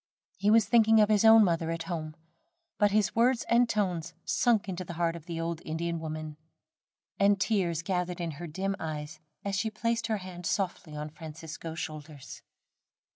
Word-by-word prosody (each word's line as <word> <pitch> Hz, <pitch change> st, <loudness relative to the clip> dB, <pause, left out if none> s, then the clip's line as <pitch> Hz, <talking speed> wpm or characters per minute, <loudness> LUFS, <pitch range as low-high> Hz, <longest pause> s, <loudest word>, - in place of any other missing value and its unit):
He 200 Hz, +2 st, +2 dB
was 220 Hz, 0 st, +6 dB
thinking 225 Hz, 0 st, +5 dB
of 210 Hz, 0 st, +5 dB
his 210 Hz, -1 st, +3 dB
own 225 Hz, 0 st, +8 dB
mother 165 Hz, -3 st, +1 dB
at 165 Hz, 0 st, -2 dB
home; 160 Hz, -3 st, -5 dB, 0.6 s
but 205 Hz, -, +5 dB
his 210 Hz, 0 st, +1 dB
words 240 Hz, +1 st, +3 dB
and 235 Hz, 0 st, +4 dB
tones 175 Hz, -5 st, -1 dB
sunk 230 Hz, -5 st, +2 dB
into 185 Hz, -1 st, -4 dB
the 170 Hz, -, -7 dB
heart 170 Hz, 0 st, 0 dB
of 170 Hz, -1 st, -11 dB
the 165 Hz, -1 st, -4 dB
old 165 Hz, 0 st, -3 dB
Indian 165 Hz, +1 st, -3 dB
woman, 155 Hz, -1 st, -6 dB, 0.8 s
and 200 Hz, 0 st, +4 dB
tears 180 Hz, -6 st, 0 dB
gathered 180 Hz, -1 st, -2 dB
in 170 Hz, -2 st, -2 dB
her 175 Hz, -, -5 dB
dim 190 Hz, +5 st, -2 dB
eyes 155 Hz, -1 st, -5 dB, 0.3 s
as 200 Hz, -, -2 dB
she 220 Hz, +3 st, 0 dB
placed 230 Hz, +1 st, -1 dB
her 220 Hz, -2 st, 0 dB
hand 180 Hz, -3 st, -7 dB
softly 180 Hz, -5 st, -2 dB
on 150 Hz, 0 st, -5 dB
Francisco's 160 Hz, 0 st, -8 dB
shoulders. 155 Hz, -3 st, -7 dB
175 Hz, 180 wpm, -29 LUFS, 160-210 Hz, 0.8 s, own